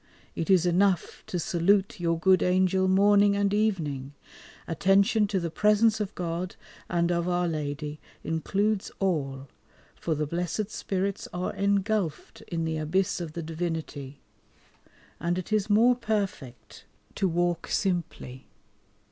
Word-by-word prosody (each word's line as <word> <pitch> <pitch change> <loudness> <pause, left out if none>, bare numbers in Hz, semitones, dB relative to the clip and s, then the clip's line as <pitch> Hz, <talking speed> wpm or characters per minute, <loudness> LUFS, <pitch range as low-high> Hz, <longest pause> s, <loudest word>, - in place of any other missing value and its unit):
It 165 - -3
is 185 -3 +5
enough 180 0 +1
to 180 - -3
salute 190 +4 +1
your 165 -1 +1
good 185 +2 +4
Angel 185 +1 +2
morning 200 +1 +5
and 200 0 +1
evening. 150 -11 -1 0.5
Attention 200 +6 +3
to 195 -1 0
the 170 -2 -3
presence 210 +3 +3
of 210 -1 -4
God 175 +1 -3 0.3
and 170 0 +1
of 170 0 0
Our 175 0 +1
Lady 150 -1 -4 0.2
includes 200 +5 -1
all, 140 -8 -1 0.5
for 160 - -2
the 150 +1 -1
blessed 175 +6 -3
Spirits 195 -1 -2
are 180 +1 -2
engulphed 200 -4 -1
in 165 -1 -2
the 160 -1 -2
abyss 180 +5 0
of 160 -3 -6
the 170 - -5
Divinity, 160 -4 -4 1.0
and 170 +2 -1
it 185 +4 -4
is 215 -1 +1
more 230 +4 +5
perfect 200 - -4 0.3
to 195 - 0
walk 175 0 0
simply. 170 -9 -2
180 Hz, 135 wpm, -27 LUFS, 165-200 Hz, 1.0 s, is